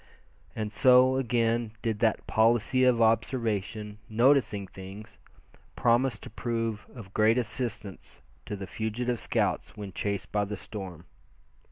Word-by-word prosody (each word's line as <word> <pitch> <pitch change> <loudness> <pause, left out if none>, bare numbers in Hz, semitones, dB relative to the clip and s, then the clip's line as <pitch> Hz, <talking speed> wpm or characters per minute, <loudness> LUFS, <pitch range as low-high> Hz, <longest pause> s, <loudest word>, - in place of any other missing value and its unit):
And 105 -1 -3
so, 130 +2 +5
again 115 -3 0
did 110 -3 -1
that 110 -2 +1
policy 120 +3 +3
of 120 -2 +4
observation, 110 -2 0
"noticing 115 -3 +3
things" 95 +3 -11 0.6
promise 120 +2 +2
to - - -11
prove 115 -3 -3
of 105 -5 -11
great 110 +2 +4
assistance 115 -4 -4 0.2
to 105 - -3
the 100 -1 -6
fugitive 115 +4 -2
scouts - - -1
when 100 -3 -7
chased 100 0 -3
by 105 -1 +1
the 105 +1 -5
storm. 95 -5 -8
110 Hz, 130 wpm, -28 LUFS, 105-120 Hz, 0.6 s, so